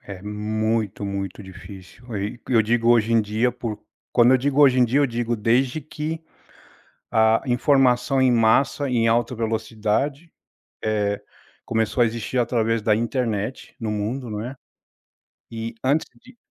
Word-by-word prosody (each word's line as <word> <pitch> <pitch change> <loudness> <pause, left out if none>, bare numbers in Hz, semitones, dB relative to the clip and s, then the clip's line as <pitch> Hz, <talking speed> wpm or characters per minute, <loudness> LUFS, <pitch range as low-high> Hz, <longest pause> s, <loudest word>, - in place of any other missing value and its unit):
É 95 -2 -10
muito, 105 0 -2
muito 100 0 -4
difícil. 95 +2 -12
Eh, 100 - -2
e 120 +3 -8
eu 115 -4 +4
digo 115 +2 +1
"hoje 115 -1 +4
em 115 - +5
dia" 110 +4 0
por 115 -3 -5 0.3
quando 120 0 +5
eu 130 - +5
digo 140 +2 -1
"hoje 130 -2 +5
em 125 - +5
dia", 130 +5 +2
eu 145 - +4
digo 120 -1 -2
desde 125 +6 +1
que 155 +2 -5 0.9
a 110 0 +3
informação 130 0 +2
em 130 -1 +4
massa, 120 +5 +2
em 120 -3 +1
alta 120 +2 +1
velocidade, 115 +7 -2 0.5
eh, 105 -2 0 0.4
começou 110 +2 0
a - - +5
existir 115 +2 -4
através 115 -2 +1
da 105 0 +3
internet 115 0 -2
no 110 -2 -2
mundo, 110 +5 -3
não 105 -1 -4
é? 130 - -6 1.0
E 115 0 -5
antes 140 +4 +1 0.2
de 255 0 -17
115 Hz, 155 wpm, -23 LUFS, 110-125 Hz, 1.0 s, em